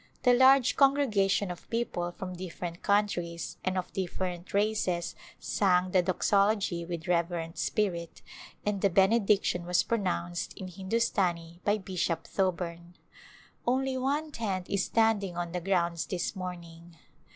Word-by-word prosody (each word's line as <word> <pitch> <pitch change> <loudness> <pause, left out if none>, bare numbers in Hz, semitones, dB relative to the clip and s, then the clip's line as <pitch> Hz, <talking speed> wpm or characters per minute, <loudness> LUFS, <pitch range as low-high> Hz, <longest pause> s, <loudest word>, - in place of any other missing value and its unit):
The 250 -1 +6
large 260 0 +5
congregation 215 -9 +3
of 175 - -10
people 200 -7 -2
from 185 +1 -7
different 175 -1 -6
countries 175 -5 0
and 185 0 -1
of 185 - -4
different 180 -1 -4
races 200 -4 0 0.3
sang 185 -2 +2
the 185 - +4
Doxology 195 0 +1
with 170 -1 -6
reverent 170 -1 -1
spirit 175 -6 -2 0.4
and 205 -2 -1
the 200 - +4
Benediction 195 -1 +3
was 175 0 +2
pronounced 85 - -2
in 185 - -6
Hindu 190 +4 -2
stani 175 -6 -1
by 205 +1 +2
Bishop 180 -4 -2
Thoburn. 175 -2 -2 0.7
Only 265 +1 +1
one 285 +4 -1
tent 195 -8 -3
is 200 -1 +1
standing 210 -5 +1
on 175 -1 -3
the 180 0 -3
grounds 170 -3 0
this 180 +2 -2
morning. 170 -2 -8
185 Hz, 135 wpm, -29 LUFS, 175-210 Hz, 0.7 s, The